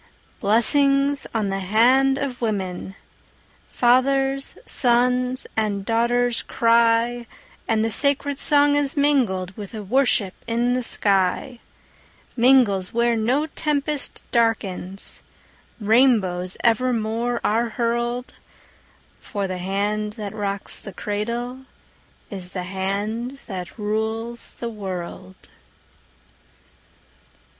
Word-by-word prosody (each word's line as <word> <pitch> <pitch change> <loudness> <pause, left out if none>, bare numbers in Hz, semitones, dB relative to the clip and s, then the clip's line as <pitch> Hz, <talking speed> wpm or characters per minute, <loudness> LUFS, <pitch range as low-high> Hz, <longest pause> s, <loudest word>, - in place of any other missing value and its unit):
Blessings 275 +6 +4
on 215 -3 -1
the 195 0 -2
hand 250 +8 +3
of 270 -3 -4
women! 190 -4 -3 0.7
Fathers, 270 +2 +1
sons, 250 +1 +2
and 205 -3 -1
daughters 235 +1 +1
cry, 230 +1 +2 0.4
And 220 -1 +1
the 225 - -1
sacred 280 +2 +2
song 290 0 +4
is 290 -1 0
mingled 225 -11 +1
With 205 -1 -9
the 215 -2 -6
worship 220 -3 +2
in 240 +1 0
the 255 - 0
sky 200 +3 0 0.8
Mingles 235 -7 +3
where 235 0 +1
no 245 +7 +1
tempest 300 -2 -1
darkens, 200 -5 -1 0.6
Rainbows 205 -6 +2
evermore 235 0 0
are 230 +2 +1
hurled; 240 +2 -2 0.9
For 200 -2 -4
the 185 -1 -4
hand 205 +3 -2
that 210 -2 -7
rocks 200 -2 -3
the 195 - -9
cradle 235 +7 -4 0.6
Is 185 -2 -8
the 180 - -4
hand 205 +7 -3
that 185 -2 -7
rules 220 +2 -3
the 235 - -5
world. 180 - -7
230 Hz, 100 wpm, -22 LUFS, 200-250 Hz, 0.9 s, Blessings